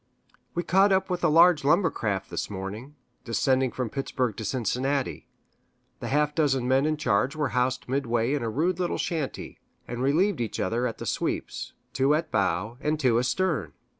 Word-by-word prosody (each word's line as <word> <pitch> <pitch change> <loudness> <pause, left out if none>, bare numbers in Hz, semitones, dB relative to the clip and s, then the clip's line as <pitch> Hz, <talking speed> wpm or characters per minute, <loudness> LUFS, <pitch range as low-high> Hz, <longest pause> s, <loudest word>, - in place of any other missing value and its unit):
We 175 - 0
caught 195 +3 +4
up 190 0 +1
with 180 -1 -2
a - - +5
large 165 0 +6
lumber 165 +4 +3
raft 100 -4 -2
this - - -3
morning, 105 +8 -6 0.3
descending 130 +2 +1
from 125 -3 -3
Pittsburg 130 -5 -2
to 110 - -5
Cincinnati. 130 +5 -1 0.7
The - - -5
half 150 +1 +1
dozen 135 -5 +1
men 135 +3 +3
in 155 0 0
charge 130 +1 +1
were 150 -2 0
housed 125 +1 0
midway 120 -2 0
in 145 - 0
a 115 - -2
rude 170 +10 0
little 180 -1 -1
shanty, 155 -6 -4 0.3
and 120 0 -4
relieved 160 +5 +2
each 115 - -3
other 120 +2 0
at - - -5
the - - -7
sweeps - - -3 0.2
two 135 +3 +3
at 160 - -2
bow, 100 +5 0
and 150 +1 0
two 125 -5 +3
astern. 140 - 0
135 Hz, 180 wpm, -26 LUFS, 120-155 Hz, 0.7 s, large